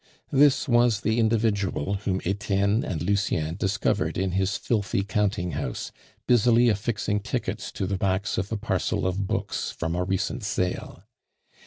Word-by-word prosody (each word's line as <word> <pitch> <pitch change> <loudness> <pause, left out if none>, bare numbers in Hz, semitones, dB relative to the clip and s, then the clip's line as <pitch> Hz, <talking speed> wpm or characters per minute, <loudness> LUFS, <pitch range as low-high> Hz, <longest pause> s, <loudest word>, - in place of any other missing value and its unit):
This 140 0 +4
was 120 -4 +3
the 110 +3 +1
individual 105 -6 +1
whom 95 -1 0
Etienne 100 +3 +1
and 80 -4 -3
Lucien 90 -5 0
discovered 100 +2 0
in 95 0 0
his 95 +2 0
filthy 100 -3 0
counting 100 -3 0
house, 70 -4 -4 0.3
busily 120 0 +5
affixing 105 0 0
tickets 110 -1 -3
to 95 - -2
the 95 0 -2
backs 100 0 0
of 100 +3 -4
a 110 - 0
parcel 100 - -1
of 95 +1 -1
books - - -2
from 80 0 -3
a 90 +1 0
recent 95 +5 -2
sale. 90 -2 -2
100 Hz, 150 wpm, -26 LUFS, 95-110 Hz, 0.3 s, busily